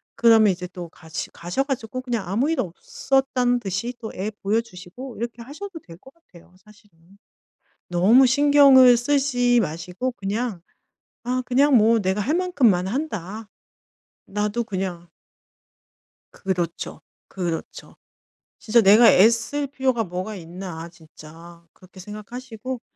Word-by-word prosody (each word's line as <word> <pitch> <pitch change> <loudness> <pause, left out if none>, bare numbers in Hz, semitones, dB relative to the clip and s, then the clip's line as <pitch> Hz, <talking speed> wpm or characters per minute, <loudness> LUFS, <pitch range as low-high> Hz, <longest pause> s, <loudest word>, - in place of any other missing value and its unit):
그러면 225 -3 +5
이제 180 +1 -7
또 175 -1 -8
같이 160 0 -7
가셔 175 +10 -3
가지고 255 -2 -4
그냥 235 -7 -3
아무 230 - 0
일 325 - -1
없었다는 245 +6 -1
듯이 200 +4 -4
또 220 - -5
애 205 +4 -4
보여주시고 220 +3 -4
이렇게 235 +1 -5
하셔도 325 +8 -9
될 165 -2 -14
것 265 +9 -18
같아요 180 - -21
사실은. 210 -4 -22 0.9
너무 215 +10 +5
신경을 275 -2 +6
쓰지 245 -2 +2
마시고 180 +8 -4
그냥 205 -1 -4 0.6
'아 255 +1 -1
그냥 275 +2 +3
뭐 225 +1 +4
내가 190 +1 -1
할 280 +9 -1
만큼만 260 - +2
한다. 215 - -5 0.8
나도 210 +3 -2
그냥' 185 -4 -5 1.2
그렇죠. 175 -3 -4 0.3
그렇죠. 175 -4 -6 0.6
진짜 230 +2 +3
'내가 220 +3 +7
애쓸 230 +8 +3
필요가 260 -4 -1
뭐가 185 +4 -5
있나, 170 -1 -8
진짜.' 165 0 -15
그렇게 185 +1 -17
생각하시고 230 +4 -8
220 Hz, 265 characters per minute, -23 LUFS, 185-255 Hz, 1.2 s, 내가